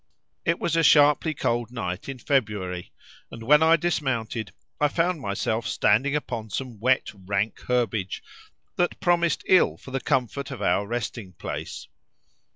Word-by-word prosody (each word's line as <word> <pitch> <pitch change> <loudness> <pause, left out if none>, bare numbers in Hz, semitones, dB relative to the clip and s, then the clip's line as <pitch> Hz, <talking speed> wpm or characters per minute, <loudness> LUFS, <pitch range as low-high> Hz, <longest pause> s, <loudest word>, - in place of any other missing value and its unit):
It 165 +1 +2
was 165 - -1
a 165 - +4
sharply 150 0 +5
cold 120 -2 -1
night 90 -3 -4
in 135 - -5
February, 105 -9 -1 0.4
and 115 - -9
when 150 +6 +5
I 160 +1 +6
dismounted 120 - -2 0.3
I 150 - +4
found 165 +2 0
myself 110 +2 -2
standing 135 +9 +2
upon 115 -7 -4
some 120 +1 -5
wet 130 +4 +2
rank 100 +2 -2
herbage 115 -6 -1 0.5
that 175 - 0
promised 170 -3 +2
ill 185 - +4
for 130 - -12
the 135 0 -2
comfort 135 0 -1
of 135 - -7
our 100 - +1
resting 115 -4 -4
place. - - -6
125 Hz, 150 wpm, -25 LUFS, 110-150 Hz, 0.5 s, I